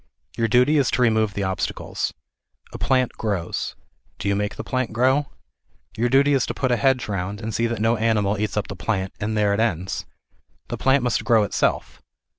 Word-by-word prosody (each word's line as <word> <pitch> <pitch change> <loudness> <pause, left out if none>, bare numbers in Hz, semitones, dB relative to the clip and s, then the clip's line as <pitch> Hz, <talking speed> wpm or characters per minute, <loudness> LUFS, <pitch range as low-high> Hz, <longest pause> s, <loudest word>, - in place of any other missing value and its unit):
Your 115 - +1
duty 125 +7 +4
is 135 - +2
to - - 0
remove 110 -3 +2
the 100 - -1
obstacles. 95 -1 -2 0.6
A - - -7
plant 130 -2 +2
grows. 100 -6 -2 0.4
Do 100 - -4
you 100 - +2
make 105 +1 -2
the - - -6
plant 130 -2 -2
grow? 130 +5 +2 0.7
Your 120 +2 +1
duty 140 +3 +4
is 135 -3 +2
to - - -4
put 130 -2 0
a - - +4
hedge 130 0 +1
round, 100 0 -3
and 110 0 -5
see 115 +2 +1
that 115 -2 -3
no 115 +2 +2
animal 110 -2 +1
eats 105 0 -2
up 105 - -1
the 100 - -6
plant, 95 -1 -2
and 110 +1 -2
there 105 -1 +3
it 100 - -1
ends. 95 -5 -1 0.6
The - - -3
plant 135 0 +3
must 125 -2 0
grow 115 -4 +4
itself. 100 - -1
110 Hz, 205 wpm, -23 LUFS, 105-125 Hz, 0.7 s, duty